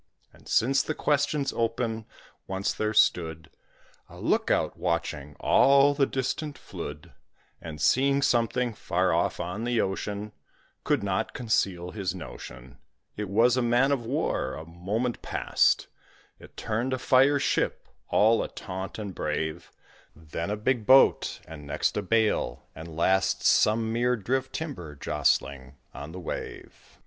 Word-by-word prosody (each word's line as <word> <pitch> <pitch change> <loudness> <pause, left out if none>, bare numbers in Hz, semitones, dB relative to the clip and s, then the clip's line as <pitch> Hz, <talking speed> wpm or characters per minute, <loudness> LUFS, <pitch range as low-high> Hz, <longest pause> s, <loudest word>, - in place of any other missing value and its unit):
And - - -19
since 135 +4 +3
the 155 - -3
question's 145 -1 0
open, 115 -1 -2 0.4
once 95 +1 -1
there 110 0 -1
stood 80 -7 +1 0.6
A - - -13
look - - +1
out - - +1
watching 75 -4 -3
all 140 +1 +5
the 140 -1 +2
distant 140 +2 -3
flood; 75 - -8 0.5
And 80 -2 -8
seeing 140 - +3
something 120 0 +1
far - - 0
off - - 0
on 90 +6 -4
the 120 -1 0
ocean, 105 +2 -2 0.5
Could - - +1
not - - -2
conceal 95 -7 -1
his 95 -3 -3
notion 65 -6 -10 0.4
It 105 -2 -4
was 115 +5 +4
a 130 - +1
man 120 +3 +3
of 135 -4 0
war; 135 - -1
a 80 +3 -8
moment 100 +9 -3
past - - +1 0.5
It - - -16
turned 115 +4 -2
a - - 0
fire 130 +2 +4
ship, 140 - -1 0.2
all 110 +2 +4
ataunt 95 0 -6
and 105 -3 -5
brave, 80 0 -3 0.4
Then 80 +2 -5
a 105 - -1
big 115 0 -1
boat, 135 +1 +5
and 75 -2 -10
next 70 - -1
a - - 0
bale, 110 - 0
and 80 +1 -9
last 95 +2 +2
Some 110 +1 +3
mere 120 +1 +2
drift 130 +6 -2
timber 90 - -6
jostling 70 -1 -1 0.2
on 75 +2 -8
the 90 - -8
wave. 90 - -8
110 Hz, 145 wpm, -27 LUFS, 85-125 Hz, 0.6 s, all